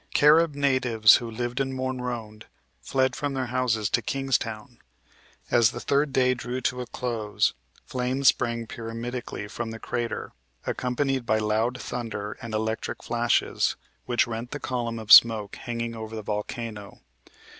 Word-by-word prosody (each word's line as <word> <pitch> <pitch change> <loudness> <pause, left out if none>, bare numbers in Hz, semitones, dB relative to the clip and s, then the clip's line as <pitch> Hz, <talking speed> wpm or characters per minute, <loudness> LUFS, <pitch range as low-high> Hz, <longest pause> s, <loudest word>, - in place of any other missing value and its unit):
Carib 150 +1 +5
natives 130 -6 +5
who 120 - -6
lived 120 +3 -3
at 135 - 0
Morne 130 -1 -3
Rond 115 -4 -6 0.3
fled 130 -1 +1
from 145 -2 -2
their 130 -1 -1
houses 115 -5 +1
to - - +2
Kingstown. 125 -3 -2 0.7
As 120 -2 +5
the - - -6
third 140 +1 +1
day 130 -1 +3
drew 125 0 -4
to 125 0 -1
a 125 - -6
close 115 -4 -1 0.3
flames 130 +1 +2
sprang 115 -1 -1
pyramidically 115 0 -6
from 115 +2 -5
the 115 - -6
crater, 120 +1 -3 0.3
accompanied 130 0 -1
by 110 - +3
loud 110 +4 0
thunder 110 -4 -5
and 115 -2 -5
electric 110 +1 -3
flashes, 120 0 +1 0.3
which 120 -1 +3
rent 115 +1 -5
the 145 - -5
column 120 -4 -3
of 110 -2 -5
smoke 110 -3 +8
hanging 115 -1 -4
over 110 0 -7
the 110 - -5
volcano. 105 0 -5
120 Hz, 150 wpm, -26 LUFS, 110-130 Hz, 0.7 s, smoke